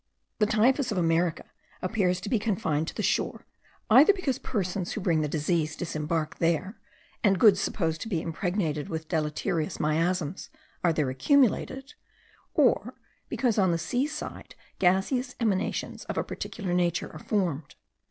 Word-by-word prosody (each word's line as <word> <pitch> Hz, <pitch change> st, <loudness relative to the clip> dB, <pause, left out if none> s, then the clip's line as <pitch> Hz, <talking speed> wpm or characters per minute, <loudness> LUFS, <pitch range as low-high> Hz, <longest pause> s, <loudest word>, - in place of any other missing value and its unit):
The 210 Hz, -, +4 dB
typhus 245 Hz, +4 st, +2 dB
of 205 Hz, -, -2 dB
America 165 Hz, -1 st, +1 dB, 0.3 s
appears 185 Hz, -2 st, 0 dB
to -, -, -6 dB
be 230 Hz, -, +2 dB
confined 180 Hz, -8 st, -1 dB
to -, -, -6 dB
the -, -, -2 dB
shore, -, -, 0 dB, 0.5 s
either 280 Hz, -, +8 dB
because 310 Hz, -, -2 dB
persons 185 Hz, -4 st, -2 dB
who -, -, -3 dB
bring 170 Hz, -5 st, +1 dB
the 150 Hz, -, 0 dB
disease 155 Hz, +1 st, 0 dB
disembark 155 Hz, -1 st, -3 dB
there, 170 Hz, +5 st, 0 dB, 0.5 s
and 195 Hz, -3 st, +4 dB
goods 205 Hz, -4 st, +6 dB
supposed 160 Hz, -6 st, -1 dB
to -, -, -4 dB
be 175 Hz, -7 st, 0 dB
impregnated 165 Hz, -2 st, -2 dB
with 160 Hz, -1 st, -4 dB
deleterious 155 Hz, 0 st, -1 dB
miasms 165 Hz, +2 st, 0 dB, 0.3 s
are 175 Hz, -, +4 dB
there 150 Hz, -5 st, 0 dB
accumulated; 270 Hz, -, +1 dB, 0.6 s
or -, -, +2 dB, 0.3 s
because 235 Hz, -5 st, +1 dB
on 190 Hz, -2 st, +4 dB
the 170 Hz, -, +1 dB
sea 245 Hz, -, -1 dB
side 300 Hz, 0 st, -7 dB, 0.2 s
gaseous 195 Hz, +8 st, +1 dB
emanations 210 Hz, -6 st, -1 dB
of -, -, -5 dB
a -, -, +1 dB
particular 195 Hz, -6 st, -5 dB
nature 175 Hz, -2 st, 0 dB
are 155 Hz, -, -8 dB
formed. 165 Hz, -9 st, -2 dB
180 Hz, 150 wpm, -27 LUFS, 160-215 Hz, 0.6 s, either